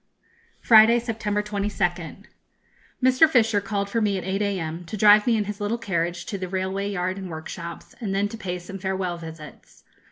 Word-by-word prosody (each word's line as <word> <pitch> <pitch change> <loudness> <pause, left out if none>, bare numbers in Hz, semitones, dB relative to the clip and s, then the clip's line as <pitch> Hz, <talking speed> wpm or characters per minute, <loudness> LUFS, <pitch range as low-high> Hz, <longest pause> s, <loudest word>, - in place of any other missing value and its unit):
_ - - -25
Friday, 225 +1 +7
September 220 -3 -2
22nd. 200 -3 -3 0.8
Mr. 260 +5 +5
Fisher 225 -7 +3
called 200 0 -2
for 230 +3 -1
me 205 -2 +1
at 185 - -5
8 190 +2 -2
a.m., 175 -5 -2
to 190 +6 -6
drive 210 +1 +6
me 230 -2 +3
in 210 - +1
his 210 +1 -6
little 205 +3 -1
carriage 175 -5 -2
to 200 - -5
the 185 - -4
railway 190 +2 -2
yard 185 0 -2
and 190 -2 -7
workshops, 170 +1 -8
and 210 -4 -3
then 200 +1 +1
to 225 - -7
pay 190 -5 -4
some 185 +2 -9
farewell 185 -2 -2
visits. 160 -2 -12
200 Hz, 190 wpm, -24 LUFS, 180-210 Hz, 0.8 s, Friday